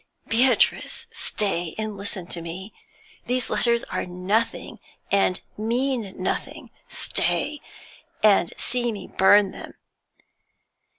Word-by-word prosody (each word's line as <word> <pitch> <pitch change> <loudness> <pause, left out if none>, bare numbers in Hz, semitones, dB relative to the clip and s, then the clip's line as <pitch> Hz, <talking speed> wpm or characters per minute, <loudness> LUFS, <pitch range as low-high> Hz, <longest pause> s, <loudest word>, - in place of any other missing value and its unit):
'Beatrice! 250 +3 +3
Stay 175 -5 -1
and 215 -1 -3
listen 195 -2 -6
to 175 -1 -5
me. 180 +5 -7 0.5
These 250 -1 -1
letters 235 -1 +3
are - - -3
nothing, 190 +6 -1 0.3
and 195 -2 +3 0.2
mean 235 -2 -1
nothing; 185 - -3 0.2
Stay, 300 0 -1 0.6
and 200 -5 +5
see 240 -1 0
me 205 -3 -6
burn 200 +1 +5
them.' - - -10
210 Hz, 105 wpm, -24 LUFS, 190-235 Hz, 0.6 s, and